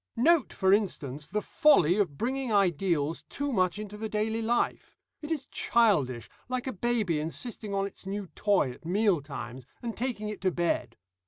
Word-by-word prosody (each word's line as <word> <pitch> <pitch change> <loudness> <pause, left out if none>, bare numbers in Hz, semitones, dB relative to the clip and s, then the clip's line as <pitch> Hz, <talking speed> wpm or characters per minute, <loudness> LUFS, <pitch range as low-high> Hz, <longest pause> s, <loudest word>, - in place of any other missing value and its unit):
"Note, 295 +2 +4
for 190 0 +3
instance, 150 -9 -1
the 210 0 -2
folly 180 - +4
of 165 -9 0
bringing 260 +1 -1
ideals 175 -5 +1
too 285 -1 -2
much 185 -2 +2
into 210 -1 -6
the 220 +1 -4
daily 220 +2 -1
life; 235 +2 -1 0.2
it 300 - -7
is 295 -4 -1
childish, 150 - +2 0.2
like 255 -1 -2
a 260 - -3
baby 215 -6 0
insisting 200 +6 -4
on 195 0 +1
its 195 -1 -9
new 200 +1 -3
toy 200 -11 +2
at - - -14
meal 190 -1 +2
times, 130 -3 -7
and 235 -2 -5
taking 235 -3 -3
it 210 -1 -6
to 190 - +3
bed. 170 -9 -1
205 Hz, 175 wpm, -29 LUFS, 165-230 Hz, 0.2 s, Note